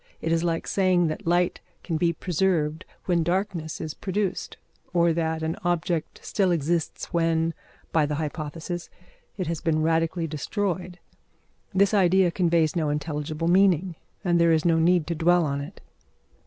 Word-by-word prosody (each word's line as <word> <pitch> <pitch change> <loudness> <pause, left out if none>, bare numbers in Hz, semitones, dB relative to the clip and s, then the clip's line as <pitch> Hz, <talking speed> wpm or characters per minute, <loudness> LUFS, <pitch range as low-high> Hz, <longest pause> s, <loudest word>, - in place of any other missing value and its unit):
It 165 - -2
is 165 0 +2
like 165 -1 -1
saying 185 -3 +2
that 155 - -5
light 175 +1 +1 0.2
can 165 - -2
be 170 +2 +2
preserved 170 -2 0 0.2
when 175 -2 +2
darkness 175 -2 -2
is 155 - -4
produced, 195 0 -3 0.4
or 170 -1 +4
that 160 -1 -1
an 160 +1 -1
object 175 -2 -1
still 195 -3 +1
exists 170 0 -1
when, 165 -1 +1 0.4
by 155 -2 +2
the 150 - -2
hypothesis, 160 +3 -5 0.5
it 185 - -2
has 165 -1 -3
been 155 -2 +1
radically 165 +1 +1
destroyed. 180 +3 -3 0.7
This 200 +2 +3
idea 190 -2 +4
conveys 170 -3 +2
no 160 -3 0
intelligible 150 +1 -2
meaning, 185 -1 +3 0.3
and 175 -3 +2
there 170 0 +5
is 160 0 +2
no 165 -1 +4
need 170 0 +3
to 170 - -2
dwell 170 +1 +3
on 140 -1 -2
it. 150 +7 -9
170 Hz, 155 wpm, -25 LUFS, 160-180 Hz, 0.7 s, there